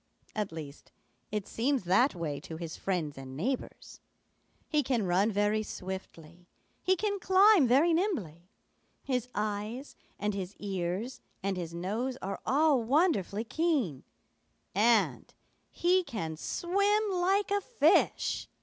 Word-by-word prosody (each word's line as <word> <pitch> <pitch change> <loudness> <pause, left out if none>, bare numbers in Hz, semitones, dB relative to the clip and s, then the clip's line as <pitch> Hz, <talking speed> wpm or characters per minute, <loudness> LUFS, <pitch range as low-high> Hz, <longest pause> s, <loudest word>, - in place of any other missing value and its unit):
At 210 -4 -2
least, 155 -3 -9 0.4
it 210 -2 -2
seems 260 +1 0
that 195 +8 +3
way 155 -5 -3
to 160 +2 -8
his 165 -1 -6
friends 160 -7 -2
and 130 0 -8
neighbors. 255 - -4 0.7
He 300 -2 +2
can 240 -6 0
run 190 +5 +2
very 205 +1 +1
swiftly; 180 -4 -8 0.3
he 375 - +3
can 405 +1 -1
climb 380 - +6
very 290 +8 +4
nimbly; 200 - -2 0.5
his 250 -2 -1
eyes 215 +5 -3 0.2
and 210 +1 -1
his 195 0 -5
ears 195 +4 -3 0.2
and 195 0 0
his 170 -2 -5
nose 220 +9 -2
are 195 +1 -4
all 285 0 +4
wonderfully 230 - +1
keen, 260 - 0 0.7
and 220 +2 +2 0.3
he 365 +2 +2
can 165 - -4
swim 400 - +1
like 385 +2 +1
a 405 0 +2
fish. 385 -6 +2
215 Hz, 130 wpm, -30 LUFS, -, 0.7 s, climb